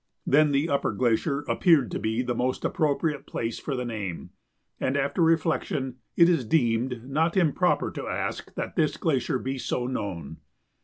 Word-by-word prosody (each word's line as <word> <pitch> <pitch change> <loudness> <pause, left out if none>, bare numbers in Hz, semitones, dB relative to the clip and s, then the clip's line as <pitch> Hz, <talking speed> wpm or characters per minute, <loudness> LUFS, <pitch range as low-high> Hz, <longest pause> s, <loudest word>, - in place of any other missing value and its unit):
Then 150 +2 +4
the 140 +3 +2
upper 140 -7 0
glacier 130 +6 +1
appeared 150 -3 +3
to - - -2
be 110 +3 -1
the 125 -1 -1
most 125 +2 -1
appropriate 150 -1 0
place 115 0 -3
for 140 - -3
the 125 -1 -3
name, 105 -7 -5 0.5
and, 135 +2 0
after 140 +5 0
reflection, 160 -5 +1 0.2
it 170 - +7
is 165 -7 +2
deemed 120 -1 0
not 160 +6 +1
improper 180 +1 +2
to - - -6
ask - - -3
that - - -4
this 155 -4 +1
glacier 135 -5 0
be 130 +1 -4
so 125 0 -2
known. 100 - -4
135 Hz, 165 wpm, -26 LUFS, 120-155 Hz, 0.5 s, it